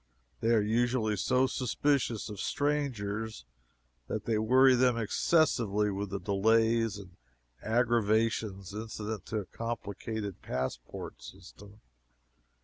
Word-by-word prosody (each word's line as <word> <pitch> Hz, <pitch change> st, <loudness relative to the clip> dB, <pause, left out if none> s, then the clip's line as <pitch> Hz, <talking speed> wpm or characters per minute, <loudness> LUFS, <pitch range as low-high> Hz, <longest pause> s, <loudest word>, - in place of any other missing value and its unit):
They 115 Hz, -, 0 dB
are 105 Hz, -, +3 dB
usually 115 Hz, 0 st, +1 dB
so 130 Hz, +6 st, +2 dB
suspicious 130 Hz, -2 st, 0 dB
of 105 Hz, -3 st, -7 dB
strangers 115 Hz, -, -2 dB, 0.6 s
that 110 Hz, +6 st, -4 dB
they 110 Hz, -2 st, +1 dB
worry 130 Hz, +4 st, +5 dB
them 125 Hz, -1 st, +3 dB
excessively 110 Hz, -4 st, +2 dB
with 100 Hz, +1 st, -3 dB
the 100 Hz, -, -3 dB
delays 110 Hz, +2 st, +2 dB
and 95 Hz, -3 st, -12 dB, 0.4 s
aggravations 110 Hz, -4 st, +1 dB
incident 110 Hz, -1 st, -5 dB
to 110 Hz, -, -2 dB
a 105 Hz, -, -3 dB
complicated 110 Hz, -2 st, -5 dB
passport 65 Hz, -2 st, -5 dB
system. 100 Hz, -, -13 dB
110 Hz, 110 wpm, -30 LUFS, 100-120 Hz, 0.6 s, worry